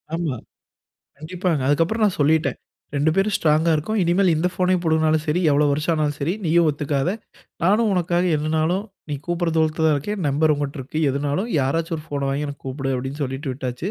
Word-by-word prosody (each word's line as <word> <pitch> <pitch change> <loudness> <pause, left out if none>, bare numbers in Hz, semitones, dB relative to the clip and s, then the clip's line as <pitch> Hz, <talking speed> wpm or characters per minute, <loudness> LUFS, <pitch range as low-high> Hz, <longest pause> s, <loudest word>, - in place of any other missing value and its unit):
ஆமா, 165 -6 -2 0.8
கண்டிப்பாங்க. 170 0 -2
அதுக்கப்புறம் 165 +10 +2
நான் 200 -3 +1
சொல்லீட்டேன். 155 +3 +2 0.4
2 150 +3 +2
பேரும் 195 +1 +1
ஸ்ட்ராங்கா 155 +1 +2
இருக்கோம். 215 +9 -2
இனிமேல் 180 +2 +3
இந்த 160 +3 +1
ஃபோனை 185 0 +1
பூடுங்குனாலும் 160 -1 +2
சரி, 155 +4 +1
எவ்வளவு 145 0 +3
வருஷம் 150 +4 0
ஆனாலும் 150 -2 -1
சரி 150 +5 0
நீயும் 170 +1 +3
ஒத்துக்காத. 145 +2 -1 0.5
நானும் 210 +4 +3
உனக்காக 175 -1 +1
என்னனாலும் 160 +5 0 0.3
நீ - - -1
கூப்பிட்ற 175 -1 -1
தூரத்துல 160 0 +2
தான் 155 - +4
இருக்கேன். 200 +7 -4
நம்பர் 150 +2 +2
உங்கிட்ட 145 0 -4
இருக்கு. 135 +4 -5
எதுனாலும் 145 - -2
யாராச்சும் 165 +5 -1
ஒரு 150 - -10
ஃபோன 140 -2 -2
வாங்கி 145 +2 -2
எனக்கு 140 - -9
கூப்பிடு 135 0 -2
அப்டினு 135 +4 -4
சொல்லீட்டு 135 +1 -4
விட்டாச்சு. 130 +7 -4
155 Hz, 175 wpm, -22 LUFS, 145-175 Hz, 0.8 s, தான்